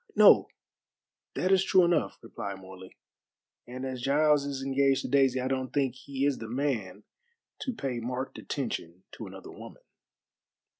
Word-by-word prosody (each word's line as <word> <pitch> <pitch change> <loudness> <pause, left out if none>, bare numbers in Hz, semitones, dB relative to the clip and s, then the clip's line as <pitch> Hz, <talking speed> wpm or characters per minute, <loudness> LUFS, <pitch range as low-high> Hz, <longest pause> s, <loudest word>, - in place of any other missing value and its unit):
"No, - - +7 0.9
that 185 - 0
is 190 -1 +5
true 190 -1 +5
enough," 170 -2 +1
replied 105 -4 -6
Morley, 95 0 -12 0.7
"and 130 +2 -6
as 130 -2 -4
Giles 145 +2 +3
is 135 -1 -4
engaged 135 0 +2
to - - -3
Daisy 135 -1 +3
I 130 - -1
don't 130 -1 -2
think 135 -4 +1
he 135 +1 -3
is 145 -2 +1
the 115 - -7
man 115 -7 -2 0.6
to 260 - -2
pay 135 - -3
marked 125 +3 -4
attention 95 - -4
to - - -8
another - - -10
woman." - - -12
130 Hz, 155 wpm, -29 LUFS, 120-140 Hz, 0.9 s, No